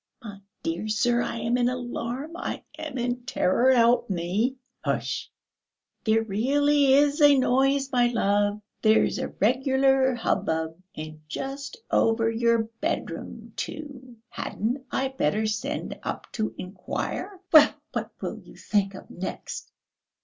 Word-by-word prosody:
"My 205 -3 -8 0.2
dear 170 +6 -2
sir! 240 +3 +2
I - - -2
am 240 +2 +1
in 245 0 +3
alarm, 250 +4 -4
I - - -4 0.2
am 305 -4 -5
in 245 0 -2
terror, 245 +3 +3
help 240 -2 +4
me." 195 +8 0 0.3
"Hush!" - - -2 0.8
"There 220 0 +3
really 275 +6 +3
is 290 +2 +4
a 290 -1 +7
noise, 270 +2 +2
my 245 -1 +4
love; 205 -3 +1 0.2
there's 220 0 +3
a - - -1
regular 265 +3 +2
hubbub. 160 -7 -1
And 155 0 -8
just 275 - -5
over 225 0 +3
your 230 0 +2 0.2
bedroom, 320 +2 -4
too. 270 -5 -7
Hadn't 245 +6 -3
I 265 0 0
better 220 - 0
send 230 +8 -3
up - - -5
to 215 -2 -2
inquire?" 210 - -5
"Well, 305 -2 +9 0.2
what - - -2
will - - -4
you - - -16
think 200 -2 0
of - - -10
next?" 185 +2 -6
240 Hz, 135 wpm, -26 LUFS, 215-270 Hz, 0.8 s, Well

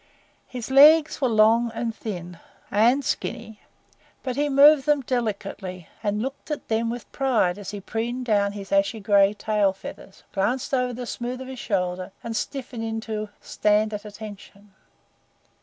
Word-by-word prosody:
His 250 0 -6
legs 300 +3 +7
were 260 - +3
long 225 +2 +4
and 230 -1 -2
thin 180 -6 -6 0.3
and 240 +7 +3
skinny, 225 -3 -4 0.6
but 255 -2 -3
he 290 +2 0
moved 285 +1 +6
them 295 -1 +3
delicately, 205 -7 -4
and 210 0 -1
looked 270 +4 -6
at 300 - -5
them 225 +1 +1
with 240 0 -6
pride 225 -9 +1
as 200 - -7
he 205 - -5
preened 235 +5 -3
down 205 -3 +2
his 200 -1 -8
ashy 200 +3 +2
gray 200 0 +4
tail 210 -2 +1
feathers, 195 0 -11
glanced 245 +8 -1
over 250 -1 +1
the 245 +1 -5
smooth 245 +1 -4
of 260 - -7
his 260 -1 -8
shoulder, 180 -2 -2
and 230 -1 -4
stiffened 245 +1 -4
into 220 -1 -4
"Stand 215 +1 +1
at 205 - -5
attention." 205 -1 -11
225 Hz, 155 wpm, -24 LUFS, 205-250 Hz, 0.6 s, legs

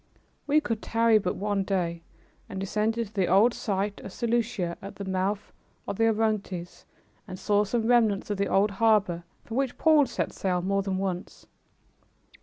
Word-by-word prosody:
We 295 +2 +5
could 230 -6 -3
tarry 230 -1 +3
but 180 -3 -2
one 205 -1 -1
day, 175 -4 -1 0.5
and 190 - -5
descended 215 +3 -1
to - - -26
the 190 -4 +1
old 210 +6 +5
site 205 -2 -2
of - - -8
Seleucia, 225 -6 -1
at 195 +1 -8
the 200 - -6
mouth 190 +2 -2 0.3
of 195 - -3
the 225 - +3
Orontes, 210 -5 -1 0.4
and 185 - -7
saw 205 +2 +2
some 220 +2 -1
remnants 225 -4 +2
of 205 - -1
the 200 0 0
old 200 +2 +2
harbor 200 -5 +2 0.2
from 230 - -5
which 265 -2 -1
Paul 310 -4 +5
set - - -3
sail 180 -2 -1
more 195 +1 +1
than 195 -1 -2
once. 190 -1 -4
205 Hz, 175 wpm, -27 LUFS, 190-225 Hz, 0.5 s, We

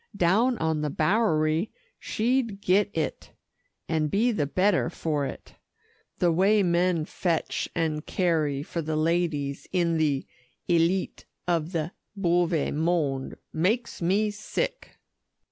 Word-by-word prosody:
Down 220 +8 +3
on 160 -1 0
the 150 - -1
Bowery, 160 0 +1 0.3
she'd 230 -2 0
get 200 +1 +3
it, 155 -3 -3 0.5
and 155 -2 0
be 225 +9 +2
the 150 -10 0
better 185 +2 +2
for 150 -4 -1
it. - - -9 0.6
The 175 -1 +3
way 195 +5 +4
men 175 -2 +2
fetch 170 0 -1
and 155 -2 -1
carry 155 -7 0
for 170 - -4
the 155 0 -2
ladies 155 -4 0
in 170 -3 +1
the 145 -4 +1 0.4
'aileet 175 +2 +1 0.2
of 170 -1 0
the 165 -1 -2 0.2
bowe 175 -3 +2 0.3
mond,' 150 -4 0 0.2
makes 210 +10 0
me 200 +5 +2
sick!" - - -4
170 Hz, 125 wpm, -26 LUFS, 155-195 Hz, 0.6 s, way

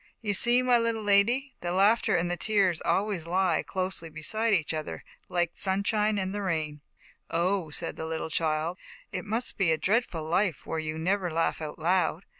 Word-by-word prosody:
You 210 -2 -2
see, 240 +5 +5
my 250 -1 +4
little 230 -1 -1
lady, 235 +7 +2
the 175 - -2
laughter 200 +5 +3
and 175 +1 0
the - - 0
tears 190 -4 +1
always 195 -5 -1
lie 180 -1 +1
closely 185 -3 -3
beside 215 +9 -1
each 170 -6 +1
other, 155 -1 -5 0.3
like 175 -1 0
the - - -8
sun 195 0 +4
shine 210 0 +1
and 190 -1 -2
the 205 - -3
rain." 155 -5 -2 0.5
"Oh?" 175 0 0
said 165 +3 -2
the 160 - -4
little 160 0 -4
child, 160 +2 -1 0.3
"It 180 - -4
must 225 +4 -2
be 185 -5 +2
a 160 - +2
dreadful 185 -1 0
life, 175 +3 0
where 160 - -3
you 155 0 -4
never 185 +2 0
laugh 165 0 -1
out 150 -1 -6
loud. 175 +1 0
185 Hz, 195 wpm, -28 LUFS, 165-205 Hz, 0.5 s, see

